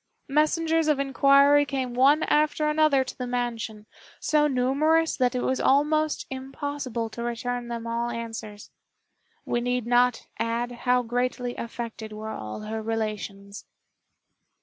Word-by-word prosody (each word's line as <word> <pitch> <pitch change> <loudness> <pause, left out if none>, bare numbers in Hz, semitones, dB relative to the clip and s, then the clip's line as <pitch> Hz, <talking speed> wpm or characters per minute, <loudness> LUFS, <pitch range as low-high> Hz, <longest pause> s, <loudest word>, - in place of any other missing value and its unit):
Messengers 320 +2 +2
of 300 -2 +3
inquiry 275 +1 +5
came 265 -3 -3
one 275 +5 +4
after 305 0 +2
another 300 -3 +3
to 255 - -8
the 250 - -5
mansion, 235 -3 -3 0.3
so 300 -1 +2
numerous 295 +5 +2
that 250 -1 +1
it 250 - -1
was 260 - 0
almost 300 +3 +2
impossible 265 -2 -4
to 235 - -7
return 240 +1 -3
them 235 -1 -5
all 235 +1 -2
answers. 225 -3 -7 0.7
We 240 - -1
need 245 -1 -1
not 245 0 +2
add 235 +1 -1 0.2
how 250 0 +4
greatly 245 +1 -2
affected 230 -2 -6
were 215 +1 -6
all 110 - -6
her 220 +1 -4
relations. 210 -2 -4
250 Hz, 135 wpm, -26 LUFS, 230-280 Hz, 0.7 s, inquiry